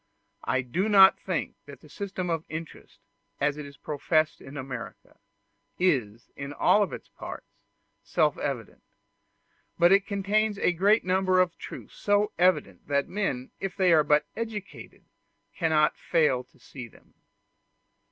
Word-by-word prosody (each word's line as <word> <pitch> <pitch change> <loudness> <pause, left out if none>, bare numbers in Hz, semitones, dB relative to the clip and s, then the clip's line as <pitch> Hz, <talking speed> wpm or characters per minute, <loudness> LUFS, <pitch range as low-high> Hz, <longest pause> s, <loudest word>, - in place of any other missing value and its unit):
I 125 +2 +1
do 180 - -1
not 195 -2 +7
think 185 -5 -3
that 140 -3 -12
the - - -16
system 185 +2 -4
of 165 -1 -1
interest, 160 0 -9 0.4
as 145 0 +1
it 150 -1 -7
is 140 - -14
professed 155 +1 0
in 135 +2 -10
America, 130 -3 -8 0.6
is, 120 - 0
in 140 +1 -6
all 205 +6 +3
its - - -8
parts, - - -9 0.6
self 155 -4 +1
evident; 130 -7 -4 1.0
but 175 +1 +5
it 200 0 +4
contains 205 +1 0
a 180 - +2
great 200 +5 +3
number 185 0 +2
of 180 -2 +2
truths - - -10
so 205 0 +1
evident 150 - +1
that 140 -1 0
men, 180 -11 -3
if 195 -1 -4
they 185 -3 +4
are 155 -2 +5
but 150 0 +3
educated, 220 -3 -7 0.5
cannot 160 -3 +2
fail 150 -7 +1
to - - -28
see 125 -4 -10
them. - - -22
165 Hz, 145 wpm, -27 LUFS, 140-195 Hz, 1.0 s, not